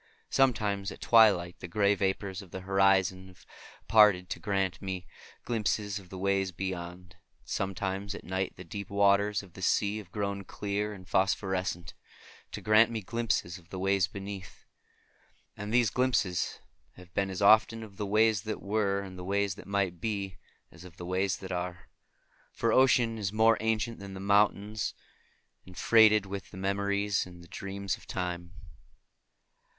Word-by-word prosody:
Sometimes 105 Hz, -7 st, +1 dB
at -, -, -10 dB
twilight 100 Hz, -7 st, +4 dB
the -, -, -7 dB
gray 100 Hz, +3 st, +2 dB
vapors 95 Hz, 0 st, -2 dB
of 95 Hz, -, -13 dB
the 95 Hz, -, -7 dB
horizon 95 Hz, -1 st, +2 dB
have 90 Hz, -2 st, -18 dB, 0.4 s
parted 105 Hz, -5 st, +5 dB
to -, -, -3 dB
grant 95 Hz, -5 st, -1 dB
me 95 Hz, -2 st, -4 dB, 0.4 s
glimpses 105 Hz, -3 st, -1 dB
of 95 Hz, -2 st, -16 dB
the 95 Hz, -, -8 dB
ways 95 Hz, 0 st, 0 dB
beyond; 90 Hz, -1 st, -6 dB
and -, -, -27 dB, 0.3 s
sometimes 95 Hz, +1 st, -3 dB
at -, -, -9 dB
night 95 Hz, +1 st, -3 dB
the 90 Hz, -, -9 dB
deep 100 Hz, +3 st, -7 dB
waters 100 Hz, 0 st, +3 dB
of 90 Hz, -3 st, -16 dB
the 95 Hz, -, -11 dB
sea 100 Hz, +2 st, +1 dB
have 95 Hz, -4 st, -12 dB
grown 100 Hz, -1 st, -3 dB
clear 105 Hz, +2 st, -3 dB
and 95 Hz, -3 st, -11 dB
phosphorescent, 95 Hz, -4 st, 0 dB, 0.6 s
to -, -, -6 dB
grant 110 Hz, +1 st, +5 dB
me 115 Hz, -2 st, -3 dB
glimpses 110 Hz, -5 st, -1 dB
of 85 Hz, -1 st, -23 dB
the 95 Hz, -, -6 dB
ways 95 Hz, -1 st, +2 dB
beneath. 100 Hz, 0 st, -8 dB, 0.9 s
And 105 Hz, +1 st, -6 dB
these 120 Hz, -2 st, +3 dB
glimpses 125 Hz, -8 st, 0 dB, 0.4 s
have 90 Hz, -1 st, -15 dB
been 100 Hz, 0 st, 0 dB
as 95 Hz, -, -5 dB
often 110 Hz, +2 st, +5 dB
of 100 Hz, -3 st, -12 dB
the 105 Hz, -, -3 dB
ways 110 Hz, 0 st, +3 dB
that 110 Hz, 0 st, -4 dB
were 100 Hz, -1 st, 0 dB
and 95 Hz, -2 st, -9 dB
the -, -, -6 dB
ways 100 Hz, +1 st, 0 dB
that -, -, -12 dB
might 95 Hz, -4 st, -1 dB
be, 100 Hz, -6 st, -3 dB, 0.3 s
as 80 Hz, +2 st, -14 dB
of 90 Hz, -2 st, -13 dB
the 90 Hz, -, -7 dB
ways 95 Hz, +2 st, 0 dB
that 95 Hz, -1 st, -8 dB
are; 90 Hz, 0 st, -4 dB, 0.6 s
for 115 Hz, -1 st, 0 dB
ocean 120 Hz, -3 st, +4 dB
is 100 Hz, -3 st, -2 dB
more 110 Hz, +1 st, +4 dB
ancient 110 Hz, +1 st, -1 dB
than 100 Hz, -1 st, -8 dB
the -, -, -7 dB
mountains, 105 Hz, +1 st, +1 dB, 0.7 s
and 90 Hz, -, -13 dB
freighted 110 Hz, -2 st, +5 dB
with 100 Hz, 0 st, -6 dB
the -, -, -11 dB
memories 100 Hz, +1 st, 0 dB
and 90 Hz, -1 st, -13 dB
the -, -, -15 dB
dreams 100 Hz, +1 st, -4 dB
of -, -, -18 dB
Time. 90 Hz, -1 st, -4 dB
100 Hz, 170 wpm, -30 LUFS, 95-105 Hz, 0.9 s, parted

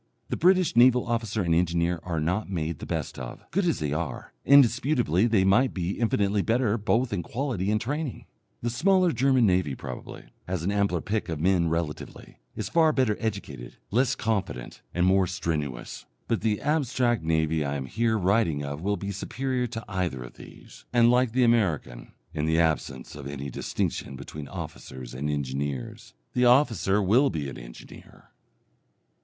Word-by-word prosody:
The -, -, -1 dB
British 185 Hz, -3 st, +3 dB
naval 125 Hz, +1 st, +6 dB
officer 115 Hz, -3 st, -1 dB
and 85 Hz, -2 st, +1 dB
engineer 85 Hz, 0 st, +1 dB
are 85 Hz, -1 st, -3 dB
not 90 Hz, +7 st, -1 dB
made 80 Hz, -4 st, -3 dB
the -, -, -7 dB
best -, -, -3 dB
of, 60 Hz, -2 st, -8 dB
good 190 Hz, +4 st, +1 dB
as 170 Hz, -, +1 dB
they 75 Hz, -2 st, -2 dB
are, 80 Hz, -4 st, -4 dB
indisputably 125 Hz, -, +4 dB
they 110 Hz, -5 st, +3 dB
might 115 Hz, +7 st, +3 dB
be 90 Hz, +1 st, -2 dB
infinitely 105 Hz, -3 st, +1 dB
better 115 Hz, 0 st, +1 dB
both 115 Hz, +3 st, +1 dB
in 95 Hz, -, -1 dB
quality 115 Hz, -, -2 dB
and 105 Hz, 0 st, +2 dB
training. 140 Hz, +3 st, -4 dB, 0.4 s
The 120 Hz, -, 0 dB
smaller 185 Hz, +6 st, +3 dB
German 130 Hz, -1 st, +3 dB
navy, 90 Hz, -8 st, +1 dB
probably, -, -, -8 dB, 0.2 s
has 90 Hz, -2 st, -2 dB
an 95 Hz, -, 0 dB
ampler 100 Hz, -4 st, +1 dB
pick 105 Hz, 0 st, -2 dB
of 80 Hz, -3 st, -3 dB
men 85 Hz, 0 st, +2 dB
relatively, 80 Hz, -2 st, -5 dB, 0.2 s
is -, -, -3 dB
far 160 Hz, -2 st, +4 dB
better 130 Hz, -7 st, +1 dB
educated, 85 Hz, -, -5 dB
less 125 Hz, +4 st, +2 dB
confident, 95 Hz, -, -3 dB
and 90 Hz, 0 st, +1 dB
more 95 Hz, 0 st, +4 dB
strenuous. 75 Hz, -9 st, -4 dB, 0.2 s
But 115 Hz, -, 0 dB
the 105 Hz, -1 st, 0 dB
abstract 130 Hz, -6 st, +1 dB
navy 80 Hz, -1 st, +1 dB
I 70 Hz, 0 st, -2 dB
am 70 Hz, -2 st, -3 dB
here 115 Hz, -, 0 dB
writing 90 Hz, -6 st, +1 dB
of 70 Hz, +2 st, -5 dB
will 100 Hz, +2 st, 0 dB
be 100 Hz, +2 st, -4 dB
superior 125 Hz, +5 st, -2 dB
to 115 Hz, -1 st, -7 dB
either 90 Hz, -9 st, -2 dB
of -, -, -11 dB
these, -, -, -14 dB
and 120 Hz, -1 st, +5 dB
like 125 Hz, -1 st, +3 dB
the 130 Hz, 0 st, +3 dB
American, 95 Hz, -, 0 dB, 0.2 s
in 75 Hz, -1 st, -1 dB
the 80 Hz, +1 st, +2 dB
absence 75 Hz, -5 st, -1 dB
of 70 Hz, -2 st, -8 dB
any 70 Hz, -1 st, -6 dB
distinction 65 Hz, -, -3 dB
between 70 Hz, +2 st, -8 dB
officers 65 Hz, -2 st, -8 dB
and 70 Hz, +4 st, -3 dB
engineers. 70 Hz, -2 st, -4 dB, 0.2 s
The 125 Hz, -, +3 dB
officer 115 Hz, -, +3 dB
will 120 Hz, +9 st, +4 dB
be 75 Hz, -5 st, -3 dB
an -, -, -9 dB
engineer. -, -, -13 dB
100 Hz, 170 wpm, -26 LUFS, 80-120 Hz, 0.4 s, naval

